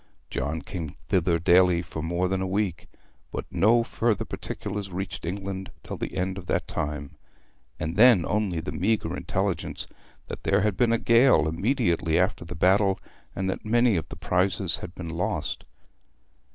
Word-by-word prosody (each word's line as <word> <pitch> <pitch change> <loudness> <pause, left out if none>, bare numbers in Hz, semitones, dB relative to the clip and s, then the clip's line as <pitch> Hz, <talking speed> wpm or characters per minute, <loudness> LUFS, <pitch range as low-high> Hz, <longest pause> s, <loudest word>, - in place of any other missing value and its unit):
John 80 +2 -2
came 80 -6 -6
thither 85 -2 +3
daily 90 +1 +4
for 80 -2 -6
more 85 +3 0
than 95 0 -1
a 95 - -1
week; 95 -4 -1 0.4
but - - -4
no 115 +3 +4
further 115 -2 0
particulars 100 -1 -5
reached 90 -2 -5
England 95 +1 -4
till - - -5
the - - -5
end 95 +1 -1
of 90 - -12
that - - 0
time, 75 -1 -3 0.7
and 80 +2 -3
then 110 -5 +6
only 100 -6 0
the - - -5
meagre 110 +4 0
intelligence - - -2 0.4
that - - -6
there - - +2
had 105 -1 +1
been 120 +3 +3
a 115 - +3
gale 115 -9 +5
immediately 85 - +1
after 90 0 +1
the 85 +1 -7
battle, 95 +3 +3 0.4
and 95 0 -2
that 95 - -3
many 120 0 +3
of 80 - -2
the - - -7
prizes 90 -1 0
had 90 0 -8
been 85 -2 -6
lost. 85 +2 -2
95 Hz, 165 wpm, -26 LUFS, 85-105 Hz, 0.7 s, then